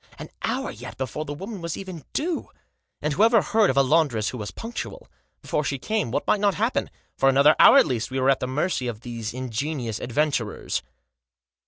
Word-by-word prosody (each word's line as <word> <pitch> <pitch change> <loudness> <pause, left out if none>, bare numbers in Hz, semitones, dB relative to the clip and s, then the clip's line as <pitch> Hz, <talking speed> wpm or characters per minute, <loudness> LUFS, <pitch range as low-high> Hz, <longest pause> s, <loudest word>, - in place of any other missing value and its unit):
An - - -8
hour - - -2
yet - - -9
before 135 +4 -4
the 145 - -5
woman 195 +4 -7
was 170 -1 -4
even 185 -6 -8
due! 330 +3 -2 0.5
And 150 - 0
whoever 225 - +5
heard 220 -2 +3
of 130 - 0
a 140 - +6
laundress 135 -7 +2
who 125 - -6
was 105 - -4
punctual? 240 - -7 0.4
Before 150 - -1
she 140 -1 -2
came 215 - -1
what 115 - -2
might 210 - +2
not 200 -1 +2
happen? 225 +5 0 0.3
For 135 - +5
another 140 +3 +6
hour, - - +9
at - - +7
least, 115 -3 -2
we 130 0 -2
were 130 +1 +4
at 135 - +1
the 125 - -2
mercy 130 0 -1
of 115 -2 -5
these 115 -2 -5
ingenious 125 -1 -3
adventurers. 125 -3 -1
140 Hz, 200 wpm, -24 LUFS, 125-190 Hz, 0.5 s, hour